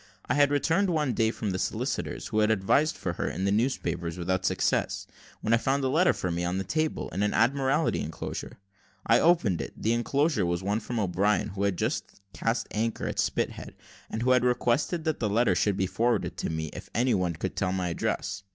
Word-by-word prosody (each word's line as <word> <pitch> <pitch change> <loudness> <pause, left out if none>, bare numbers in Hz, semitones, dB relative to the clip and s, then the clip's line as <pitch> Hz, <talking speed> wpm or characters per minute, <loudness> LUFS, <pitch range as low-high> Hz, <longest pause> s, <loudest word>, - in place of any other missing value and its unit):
I - - 0
had 145 -1 +4
returned 165 +7 +2
one 150 -6 +1
day 110 -1 +2
from 110 -2 -3
the 95 - -2
solicitor's, - - -2
who 110 - 0
had 105 0 +3
advertised 110 +9 +2
for - - -3
her - - -2
in 95 +4 -3
the 100 - +2
newspapers 90 -7 -1
without 95 +1 -1
success, - - 0 0.4
when 110 - +1
I - - +6
found 135 +4 0
a 130 - +1
letter 165 +6 +4
for 90 - -3
me 85 +1 -2
on 90 +1 -1
the 95 - -1
table, 155 - -1
in 95 - -3
an 105 0 +1
Admiralty 135 +6 +2
enclosure. 80 +3 -6 0.5
I - - +5
opened 110 - +3
it 70 - -6
the 110 - +1
enclosure 135 - +1
was 85 +1 -1
one 100 +3 0
from 120 +1 -4
O'Brien, 100 +2 +1
who 100 0 -2
had 100 -3 0
just - - -3
cast 115 +1 -1
anchor 115 +1 -1
at - - -3
Spithead, - - -2 0.3
and 110 - -3
who 130 - +3
had 125 -1 +4
requested 125 +7 +1
that 155 -1 -1
the 110 - 0
letter 115 +4 +3
should 100 -2 +1
be 95 - +1
forwarded 115 +5 0
to - - -2
me, 80 -1 -3
if - - -9
any 125 +1 +3
one 90 -3 +1
could 95 +3 -4
tell 90 -2 0
my 90 -1 -1
address. 100 +4 -2
110 Hz, 215 wpm, -28 LUFS, 95-130 Hz, 0.5 s, I